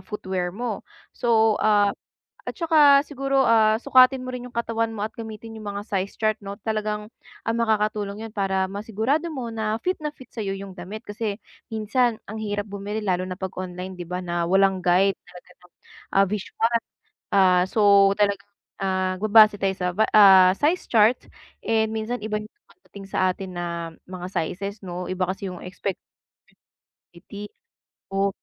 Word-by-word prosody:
footwear 190 -4 -3
mo. 235 -2 -4 0.3
So 225 -2 +3
ah, 205 -1 +4 0.6
at - - -5
saka 300 -4 +6
siguro, 275 -1 0
ah, 220 -2 +4
sukatin 260 -1 +5
mo 255 - -5
rin 250 0 -6
yung - - -20
katawan 230 -1 0
mo 210 -1 -3
at 220 - -5
gamitin 225 0 -8
yung 210 - -7
mga 205 +1 -5
size 195 -2 -3
chart 215 -1 +1
'no 200 0 -6
at - - -47
talagang, 215 -1 -2 0.4
ah, 225 - +1
makakatulong 215 -2 -1
yun - - -17
para 195 -2 0
masigurado 225 - -1
mo 260 -6 -5
na 220 -1 -1
fit 365 +1 +1
na 300 - -1
fit 260 -4 -16
sa'yo 195 -4 -3
yung 195 0 -8
damit. 190 +5 -8
Kasi 205 -1 -3 0.4
minsan 225 +2 +1
ang 220 +2 -7
hirap 205 -1 -2
bumili 205 +1 -5
lalo 185 -2 0
na 185 - -5
'pag 190 -1 -4
online, 185 0 -6
'di 175 - -5
ba, 180 +1 -3
na 175 -1 -1
walang 195 0 +3
guide 185 +3 +4
talaga 180 0 -15
nung, 180 - -22 0.4
ah, 195 - +6
visual, 225 +3 -1 0.6
ah, 185 -2 +5
so 200 -2 +5
talagang, 200 -1 0 0.3
ah, 185 -1 0
babase 215 0 +7
tayo 195 - +2
sa 180 - -1 0.3
ah, 190 -3 +8
size 325 +5 +1
chart, 225 +2 +5 0.5
eh, 220 -1 +2
minsan 220 +2 -3
iba 215 -1 -2
yung 215 - -12
dumadating 205 - -15
sa 185 -1 +1
atin 190 +1 -8
na 175 - -3 0.4
mga 180 -1 -6
sizes 200 +5 -3
noh 180 0 -5
iba 185 0 -2
kasi 195 +1 -5
yung 180 - -9
expectation 180 +1 -5 1.1
reality, 200 +4 -9 0.7
oh. 195 +1 +2
210 Hz, 170 wpm, -24 LUFS, 190-225 Hz, 1.1 s, ah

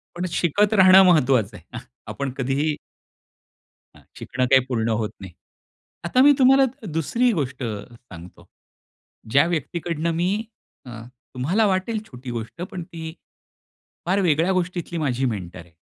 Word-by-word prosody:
पण 175 +1 -3
शिकत 205 +6 +1
राहणं 190 -1 +7
महत्त्वाचं 130 - +2
आहे. 90 - -10 0.3
आपण 140 -2 -4
कधीही 140 +4 -1 1.2
हां, - - -18 0.2
शिकणं 130 0 -2
काही 135 -1 +7
पूर्ण 115 -4 -1
होत 105 - -2
नाही. 95 -2 -10 0.7
आता 210 +9 +1
मी 290 +1 +7
तुम्हाला 270 +1 +5 0.3
दुसरी 235 - +1
गोष्ट 135 - -3
सांगतो. 105 -5 -10 0.8
ज्या 140 +5 +4
व्यक्तीकडनं 170 0 -2
मी 175 +3 0 0.6
अ, - - -9 0.4
तुम्हाला 170 - +1
वाटेल 195 +3 -1
छोटी 125 0 -10
गोष्ट 115 +8 -6
पण 185 -2 -6
ती, 160 -1 -8 0.9
फार 190 +3 +1
वेगळ्या 165 +1 +2
गोष्टीतली 175 -2 -3
माझी 135 -3 -1
मेंटर 95 -7 -5
आहे. 85 -2 -15
155 Hz, 130 wpm, -22 LUFS, 125-180 Hz, 1.2 s, राहणं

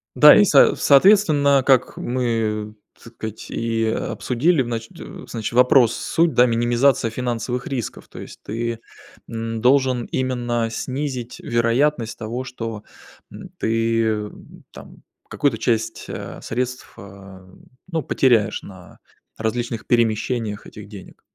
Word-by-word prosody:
Да, - - +9
и - - +6
со - - +5
соответственно, 145 -4 +4
как 130 -2 +2
мы, 115 -4 -2 0.3
так 115 - -14
сказать, 110 -1 -8
и 115 -1 -1
обсудили, 130 +7 0
значит 115 -2 -4 0.4
значит 115 -1 -5
вопрос 125 -1 +5
суть, 165 -3 0
да, 125 - +6
минимизации 120 +1 +2
финансовых 125 +1 -3
рисков, 125 -5 -5
то - - -12
есть - - -11
ты, 115 +1 -4 0.5
эм, 115 0 -4
должен 130 -1 +2
именно 120 -3 -2
снизить 130 -1 -5
вероятность 120 +1 0
того, 120 +3 -4
что, 115 -4 -7 0.5
эм, 185 - -10
ты 115 -2 0 0.4
там - - -14 0.3
какую-то 140 -6 0
часть, 115 -1 -2
а, - - -7
средств, 125 0 -4
а, 95 -1 -13 0.4
ну 160 -2 -1
потеряешь 115 -6 +2
на 95 -3 -14 0.4
различных 115 +1 -3
перемещениях 115 -2 0
этих 105 -1 -11
денег. 100 -3 -13
120 Hz, 120 wpm, -21 LUFS, 110-130 Hz, 0.5 s, Да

